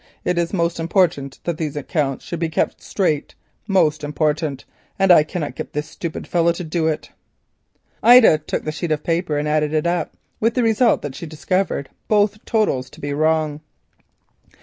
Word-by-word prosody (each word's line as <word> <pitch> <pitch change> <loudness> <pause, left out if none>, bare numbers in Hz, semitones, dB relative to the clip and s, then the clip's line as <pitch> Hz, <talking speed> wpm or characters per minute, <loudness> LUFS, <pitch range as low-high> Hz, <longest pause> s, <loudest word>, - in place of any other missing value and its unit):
It 180 -1 +1
is 170 -1 -1
most 170 -3 0
important 165 -5 +1
that 170 -2 -3
these 150 -3 -3
accounts 145 -1 -2
should 170 - -5
be 165 -1 -1
kept 160 - -1
straight. 160 -7 -1 0.3
Most 155 -7 +2
important, 150 -1 -1 0.3
and 195 -1 +4
I 170 - +8
cannot 155 0 -4
get - - -7
this 150 +1 -3
stupid 165 -1 -6
fellow 170 -1 +2
to 180 - -6
do 160 0 -1
it." 155 -1 -3 0.9
Ida 240 -10 +7
took 155 - -4
the 155 - -3
sheet 160 +2 -4
of 150 -1 0
paper 165 -2 0
and 150 +1 -1
added 150 0 +1
it 155 - +1
up, 175 0 -1 0.2
with 225 +1 +1
the 250 - +2
result 230 +1 +3
that 145 -2 -4
she 165 - -7
discovered 160 -1 -1 0.2
both 210 0 +2
totals 170 - 0
to - - -15
be 145 0 -3
wrong. 155 0 +1
160 Hz, 180 wpm, -21 LUFS, 150-180 Hz, 0.9 s, I